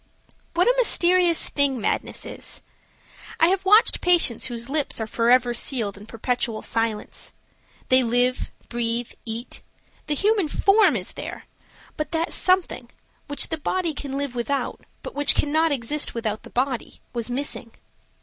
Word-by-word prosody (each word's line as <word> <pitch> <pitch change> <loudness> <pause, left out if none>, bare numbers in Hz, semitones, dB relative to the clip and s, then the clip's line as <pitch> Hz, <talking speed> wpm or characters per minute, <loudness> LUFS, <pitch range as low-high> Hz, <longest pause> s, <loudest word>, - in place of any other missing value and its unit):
What 355 +2 +3
a - - +5
mysterious 355 -7 +3
thing 280 -3 +1
madness - - -2
is. - - -8 0.8
I 330 - +5
have 385 0 0
watched 420 +4 +5
patients 340 -10 +3
whose 235 -1 -6
lips 290 -2 0
are 220 - -2
forever 240 +2 +3
sealed 230 -4 0
in 200 +1 -11
a - - -24
perpetual 230 -1 -2
silence. 225 -2 -3 0.6
They 255 0 +6
live, 245 +1 +1 0.2
breathe, 235 0 -2
eat; 230 +2 -3 0.5
the 300 - 0
human 405 +1 +2
form 395 - +4
is 185 -4 -4
there, - - -7 0.5
but 305 - -3
that 325 +1 -1
something, 365 -10 +1 0.4
which 285 0 0
the 320 - -3
body 340 +1 -1
can 280 -2 -5
live 280 -3 -3
without, 250 +3 -3 0.2
but - - -7
which 290 0 +3
cannot 315 +2 +2
exist 285 +2 -1
without 220 -2 -2
the - - -13
body, 255 -1 -2
was 235 -1 -3
missing. 250 -2 -4
265 Hz, 150 wpm, -23 LUFS, 235-325 Hz, 0.8 s, They